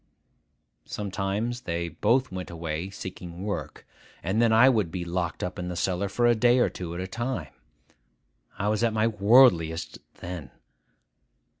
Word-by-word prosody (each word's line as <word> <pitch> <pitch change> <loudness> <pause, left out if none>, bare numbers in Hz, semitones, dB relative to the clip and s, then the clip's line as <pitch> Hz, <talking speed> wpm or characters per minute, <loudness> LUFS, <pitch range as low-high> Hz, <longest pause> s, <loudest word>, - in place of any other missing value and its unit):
Sometimes 105 +4 -3
they 85 -5 -2
both 115 - +1
went 95 -1 -5
away 85 +1 -4
seeking 90 -2 -8
work; 105 -1 -5 0.4
and 95 +6 +1
then 115 -1 +4
I 115 +4 +7
would 110 -9 +3
be 90 +1 -4
locked 85 -1 -2
up 90 - -4
in 90 - -4
the 90 - -4
cellar 95 +3 -1
for 120 +5 +1
a 120 - +6
day 120 +2 +4
or 125 - +3
two 85 -2 -6
at - - -4
a 90 - -3
time. 115 - -4 1.0
I 100 - -1
was 110 +2 0
at 115 -1 +2
my 110 0 +2
worldliest 100 -7 +4 0.2
then. 85 -6 -7
95 Hz, 160 wpm, -27 LUFS, 85-115 Hz, 1.0 s, I